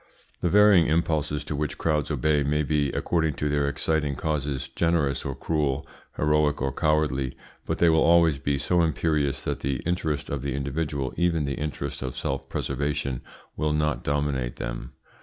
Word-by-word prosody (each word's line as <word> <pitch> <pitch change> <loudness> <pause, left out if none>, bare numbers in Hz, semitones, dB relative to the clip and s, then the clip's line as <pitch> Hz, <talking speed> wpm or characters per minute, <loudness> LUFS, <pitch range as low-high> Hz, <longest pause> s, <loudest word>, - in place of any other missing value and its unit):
The 90 - +1
varying 105 -3 +6
impulses 80 -2 0
to 75 - -4
which 75 +1 -2
crowds 75 -3 0
obey 75 0 +2
may 75 +2 +1
be, 75 -1 +1
according 80 -4 0
to 75 - -1
their 70 -1 +1
exciting 75 0 0
causes, 70 -3 -2
generous 75 -1 0
or - - -3
cruel, 75 -4 -1 0.3
heroic 75 -1 +2
or 70 0 -1
cowardly, 75 -4 0 0.3
but - - -1
they 85 - +4
will 80 -1 +4
always 85 -4 +5
be 70 +1 0
so 85 +6 +2
imperious 75 -3 0
that - - -2
the 70 0 -1
interest 80 -4 -1
of 70 -2 -2
the 70 -1 -2
individual, 70 -1 -2
even 85 -4 +1
the 70 - -2
interest 75 0 -4
of 65 -1 -5
self - - -3
preservation, 70 -2 -2 0.3
will 75 0 0
not 75 0 0
dominate 70 -4 -1
them. - - -5
75 Hz, 170 wpm, -26 LUFS, 70-80 Hz, 0.3 s, varying